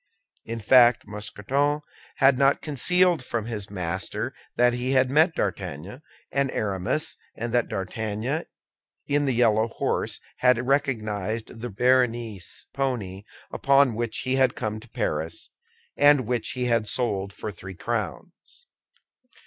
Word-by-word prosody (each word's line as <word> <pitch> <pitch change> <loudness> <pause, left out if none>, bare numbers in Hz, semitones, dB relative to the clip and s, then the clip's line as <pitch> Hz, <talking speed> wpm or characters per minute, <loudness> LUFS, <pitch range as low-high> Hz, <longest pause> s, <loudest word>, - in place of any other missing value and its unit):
In 115 0 -4
fact, 120 +2 +5
Mousqueton 130 +8 -1 0.3
had 135 -1 +5
not 135 +2 +3
concealed 175 +2 +3
from 120 -3 -3
his 105 -4 -5
master 95 -2 -3 0.2
that 120 0 +4
he 125 +2 -1
had 130 -1 +3
met 160 +4 +4
D'Artagnan 90 - -4 0.3
and 140 -1 +1
Aramis, 100 +8 -2 0.2
and 115 +1 -4
that 120 -2 +2
D'Artagnan 110 - -3 0.6
in 145 0 +1
the 135 - +2
yellow 110 -2 +3
horse 110 - -2 0.2
had 125 -1 +3
recognized 110 -5 -1
the 120 - -4
Béarnese 120 -3 0
pony 105 -8 -3 0.3
upon 140 -2 +4
which 115 0 -2
he 130 +1 0
had 130 -2 +3
come 110 -2 -3
to 115 +2 -16
Paris, 80 -4 -3 0.4
and 145 -3 +5
which 120 0 -1
he 125 -1 -2
had 115 -3 +1
sold 100 -6 0
for 105 +1 -6
three 95 0 -9
crowns. 485 - -5
120 Hz, 135 wpm, -25 LUFS, 105-135 Hz, 0.6 s, fact